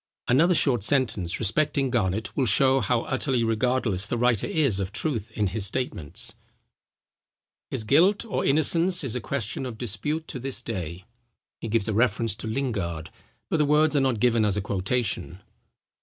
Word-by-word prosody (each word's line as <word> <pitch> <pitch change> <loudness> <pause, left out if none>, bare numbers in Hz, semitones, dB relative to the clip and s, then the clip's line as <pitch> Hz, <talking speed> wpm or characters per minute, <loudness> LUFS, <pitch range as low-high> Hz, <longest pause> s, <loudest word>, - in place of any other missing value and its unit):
Another 165 +8 +4
short 130 -8 +3
sentence 110 -9 +1
respecting 135 +4 +1
Garnet, 110 -3 -1
will 130 -3 +1
show 130 +5 +4
how 120 +1 0
utterly 130 -2 0
regardless 115 -3 0
the 120 - -2
writer 120 -3 +2
is 150 - +1
of 95 0 -3
truth 115 -1 -1
in 105 - 0
his 100 +1 -1
statements: 100 - -3 1.4
"His - - -3
guilt 180 - +3
or 225 - -2
innocence 165 +5 +2
is 125 -4 -3
a 125 - -2
question 110 -2 -3
of 125 -4 -6
dispute 125 +9 -3
to 130 - -5
this 135 +1 -3
day." 90 -4 -5 0.5
He - - -5
gives 110 -2 0
a 110 - -1
reference 115 -1 +1
to - - -6
Lingard; 100 - -3 0.4
but - - 0
the 150 - +3
words 150 +1 +3
are 140 - +4
not 130 -5 0
given 115 -1 +3
as 105 -1 +1
a - - 0
quotation. 100 -1 -2
120 Hz, 170 wpm, -25 LUFS, 105-135 Hz, 1.4 s, Another